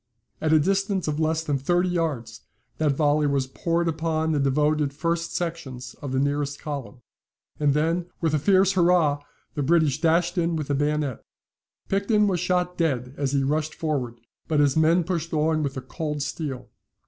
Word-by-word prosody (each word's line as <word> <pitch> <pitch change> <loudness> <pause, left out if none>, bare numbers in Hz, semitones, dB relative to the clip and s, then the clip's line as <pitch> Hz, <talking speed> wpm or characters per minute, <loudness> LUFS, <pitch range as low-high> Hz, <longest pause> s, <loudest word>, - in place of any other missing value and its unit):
At 155 - +1
a 160 - +7
distance 195 +2 0
of 150 0 -1
less 160 0 +1
than 145 -3 -1
thirty 175 +6 +1
yards 140 -10 -2 0.4
that 150 -2 +2
volley 150 +1 +2
was 140 -2 +1
poured 170 +5 -1
upon 160 0 0
the 150 - +1
devoted 150 +1 +1
first 165 +2 -2
sections 135 -8 -4
of 140 - -5
the 130 - 0
nearest 145 +1 -1
column; 140 -4 -6 0.6
and 145 -2 +2
then, 165 +3 0
with 160 -2 0
a 155 - +2
fierce 190 +4 +4
hurrah, 170 -6 +3 0.3
the 150 - -2
British 155 -1 +2
dashed 175 +2 +2
in 170 0 +1
with 150 -3 -4
the - - +2
bayonet. 145 -2 -1 0.6
Picton 205 +2 +2
was 190 -4 +1
shot 180 0 0
dead 130 -6 0
as 140 -1 -2
he 140 -1 +2
rushed 150 +3 -1
forward, 130 -7 -2 0.3
but 155 -2 +1
his 145 -2 +3
men 165 +2 +4
pushed 165 -2 -3
on 155 0 +2
with 140 -2 -2
the 130 - -4
cold 150 +2 -4
steel. 135 -5 -5
155 Hz, 180 wpm, -25 LUFS, 140-170 Hz, 0.6 s, a